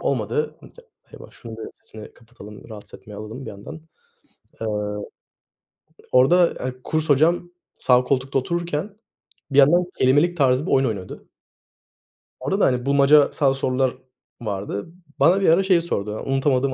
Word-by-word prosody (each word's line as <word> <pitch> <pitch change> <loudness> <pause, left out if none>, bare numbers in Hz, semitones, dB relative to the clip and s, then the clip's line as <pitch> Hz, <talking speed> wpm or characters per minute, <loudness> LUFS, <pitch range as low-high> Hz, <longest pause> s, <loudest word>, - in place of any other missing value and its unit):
olmadı. 455 0 -2
Un - - -13
te 485 - -18 0.3
Eyvah, - - -13
şunun 115 -3 -11
bir 110 - -8
sesini 110 -1 -13
kapatalım, 115 -3 -14
rahatsız 105 -2 -12
etmeye 105 - -13
alalım 110 +6 -8
bir - - -6
yandan. 105 +11 -10 0.8
Eee, 110 - -2 1.4
orada, 170 +8 +4
hani, 130 0 -4
kurs 155 0 -2
hocam 170 +5 +2 0.2
sağ 125 0 +3
koltukta 135 +1 0
otururken 170 +6 -3 0.6
bir 140 - +1
yandan 170 +6 +6
kelimelik 145 +7 +2
tarzı 135 +1 +2
bir - - -3
oyun 135 0 +3
oynuyordu. 100 -5 -6 1.1
Orada 165 +11 -2
da, - - +4
hani, 125 -1 0
bulmacasal 140 0 +4
sorular 130 -1 -1 0.5
vardı. 100 +2 -5 0.3
Bana 185 +4 +4
bir 190 - +3
ara 170 +4 +4
şey 185 -3 +3
sordu, 105 -10 -3
unutamadığım 135 0 +1
135 Hz, 145 wpm, -22 LUFS, 120-165 Hz, 1.4 s, yandan